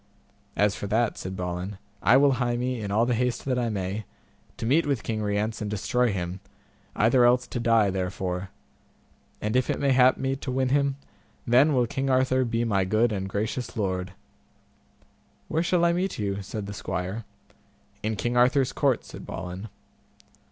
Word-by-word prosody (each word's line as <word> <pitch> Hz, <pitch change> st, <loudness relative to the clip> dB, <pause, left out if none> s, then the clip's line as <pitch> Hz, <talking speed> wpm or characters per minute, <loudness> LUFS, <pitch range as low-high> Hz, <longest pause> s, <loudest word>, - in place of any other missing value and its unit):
As 105 Hz, 0 st, +2 dB
for 100 Hz, -, -5 dB
that, 110 Hz, +2 st, +1 dB
said 95 Hz, +1 st, -6 dB
Balin, 90 Hz, +2 st, -4 dB, 0.2 s
I 125 Hz, -, +6 dB
will 140 Hz, 0 st, +5 dB
hie 120 Hz, -1 st, +1 dB
me, 125 Hz, -1 st, -2 dB
in 100 Hz, -, -4 dB
all 110 Hz, +4 st, +2 dB
the 125 Hz, -, +1 dB
haste 120 Hz, 0 st, -1 dB
that 130 Hz, -2 st, 0 dB
I 120 Hz, -1 st, 0 dB
may, 100 Hz, 0 st, -3 dB, 0.5 s
to -, -, -4 dB
meet 145 Hz, +7 st, +3 dB
with 135 Hz, -5 st, 0 dB
King 110 Hz, -1 st, -2 dB
Rience 105 Hz, +2 st, -1 dB
and 105 Hz, -, -2 dB
destroy 115 Hz, +4 st, +1 dB
him, 90 Hz, -1 st, -4 dB, 0.6 s
either 120 Hz, +3 st, +4 dB
else 125 Hz, +1 st, +4 dB
to 120 Hz, -, -4 dB
die 115 Hz, -4 st, +3 dB
therefore; 95 Hz, 0 st, -3 dB, 0.9 s
and 105 Hz, +3 st, -1 dB
if 130 Hz, -1 st, +2 dB
it -, -, 0 dB
may 140 Hz, -1 st, +2 dB
hap 130 Hz, 0 st, +5 dB
me 135 Hz, 0 st, -1 dB
to 130 Hz, -, -5 dB
win 130 Hz, 0 st, +1 dB
him, 140 Hz, 0 st, +2 dB, 0.5 s
then 135 Hz, +5 st, +4 dB
will 125 Hz, -1 st, +3 dB
King 135 Hz, +3 st, -2 dB
Arthur 130 Hz, 0 st, +3 dB
be 115 Hz, -1 st, 0 dB
my 100 Hz, -4 st, +2 dB
good 110 Hz, +5 st, +2 dB
and 95 Hz, -2 st, -3 dB
gracious 110 Hz, +4 st, -3 dB
lord. 95 Hz, -3 st, -2 dB, 1.4 s
Where 160 Hz, -, +1 dB
shall 170 Hz, 0 st, +2 dB
I 170 Hz, -, +3 dB
meet 185 Hz, +2 st, -1 dB
with -, -, -8 dB
you? 100 Hz, -1 st, -2 dB
said 100 Hz, +2 st, -5 dB
the 100 Hz, -, -6 dB
squire. 95 Hz, +3 st, -4 dB, 0.8 s
In 110 Hz, +1 st, -1 dB
King 120 Hz, +3 st, -2 dB
Arthur's 130 Hz, +2 st, +3 dB
court, 135 Hz, -5 st, +1 dB
said -, -, -10 dB
Balin. 95 Hz, +4 st, -6 dB
115 Hz, 185 wpm, -26 LUFS, 100-130 Hz, 1.4 s, I